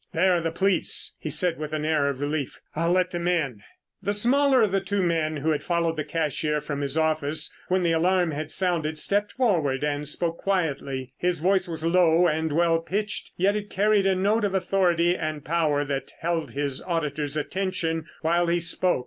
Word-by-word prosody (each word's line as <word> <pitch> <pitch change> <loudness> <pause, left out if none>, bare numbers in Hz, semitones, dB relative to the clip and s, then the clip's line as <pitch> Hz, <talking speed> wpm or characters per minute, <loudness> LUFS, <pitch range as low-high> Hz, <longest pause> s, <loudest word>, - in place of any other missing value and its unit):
"There 180 +2 +3
are 170 - 0
the 165 - -1
police," 190 +3 +1
he 155 - -5
said 170 +2 +1
with 155 0 -5
an 155 0 -2
air 155 -2 +2
of 140 -1 -5
relief. 145 -1 -3 0.2
"I'll 165 +2 +1
let 185 0 +2
them 175 0 -3
in." 145 - 0 0.4
The 200 +2 -1
smaller 260 +3 +4
of 210 - +1
the 195 0 +1
two 200 0 -1
men 160 -3 0
who 155 +3 0
had 150 - -1
followed 170 -1 0
the 155 - -2
cashier 150 -1 -1
from 145 -1 -4
his 140 +1 -1
office 155 -1 0
when 185 0 +1
the 170 - +2
alarm 175 +1 +2
had 155 +1 -5
sounded 165 -4 +1
stepped 205 +5 0
forward 160 - +1
and 145 0 -2
spoke 165 +2 -2
quietly. 140 -8 -2
His 180 -1 +1
voice 185 +3 +1
was 165 -1 -5
low 170 0 +4
and 160 -1 0
well 165 +1 +2
pitched 210 +5 -3
yet 195 +3 +2
it 205 -1 -4
carried 205 0 +2
a 190 - +3
note 205 +4 +1
of 200 -2 0
authority 175 -2 +2
and 155 -3 -4
power 150 -3 +1
that 140 -1 -4
held 165 0 -2
his 140 -2 -2
auditors' 150 -4 -2
attention 165 -1 -2 0.2
while 170 +2 +2
he 170 +1 +2
spoke. 175 0 +1
165 Hz, 200 wpm, -25 LUFS, 155-185 Hz, 0.4 s, smaller